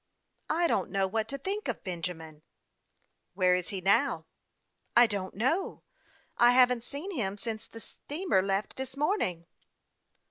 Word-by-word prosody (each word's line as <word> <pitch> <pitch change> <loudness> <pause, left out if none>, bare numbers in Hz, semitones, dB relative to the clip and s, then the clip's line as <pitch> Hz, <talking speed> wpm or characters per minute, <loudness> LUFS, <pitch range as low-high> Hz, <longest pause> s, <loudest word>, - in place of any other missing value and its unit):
" - - -47
I 340 +2 +2
don't - - +1
know 195 -1 +1
what 220 +3 -1
to 275 - -4
think 400 +9 -3
of - - -3
Benjamin." 165 -4 -5 0.5
" - - -47
Where 185 -1 +4
is 180 -1 -1
he 195 -2 -4
now? 195 +2 +2 0.2
" - - -50
" - - -8
I 240 - +9
don't 200 -4 -3
know; 265 - -1 0.6
I 240 +1 +7
haven't 250 -2 +4
seen 290 +10 -6
him 205 - -2
since 220 0 -5
the 225 - -11
steamer 305 - -1
left 195 +2 -2
this 265 0 -5
morning." 280 - 0
220 Hz, 170 wpm, -29 LUFS, 190-275 Hz, 0.6 s, I